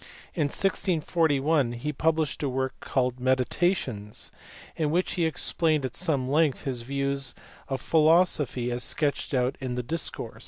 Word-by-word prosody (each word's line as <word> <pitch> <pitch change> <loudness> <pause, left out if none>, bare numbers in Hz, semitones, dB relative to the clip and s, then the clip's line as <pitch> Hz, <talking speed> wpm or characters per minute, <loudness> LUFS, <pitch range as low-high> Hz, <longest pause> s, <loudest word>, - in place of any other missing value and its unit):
In 160 -5 +1
1641 155 -5 +1
he 140 +6 -3
published 160 0 0
a 145 - 0
work 130 0 -1
called 125 -1 -1
Meditationes 130 - 0 0.4
in 155 -2 0
which 175 +4 +1
he 175 -3 0
explained 155 -2 +1
at 130 - -5
some 145 -8 0
length 150 0 +2
his 130 -3 -3
views 140 +1 -1 0.3
of 135 -2 -3
philosophy 155 -6 +3
as 120 +1 -2
sketched 145 -1 -1
out 125 +1 +1
in 130 -2 -3
the 125 - -2
Discours. 160 +7 -4
140 Hz, 145 wpm, -27 LUFS, 130-160 Hz, 0.4 s, philosophy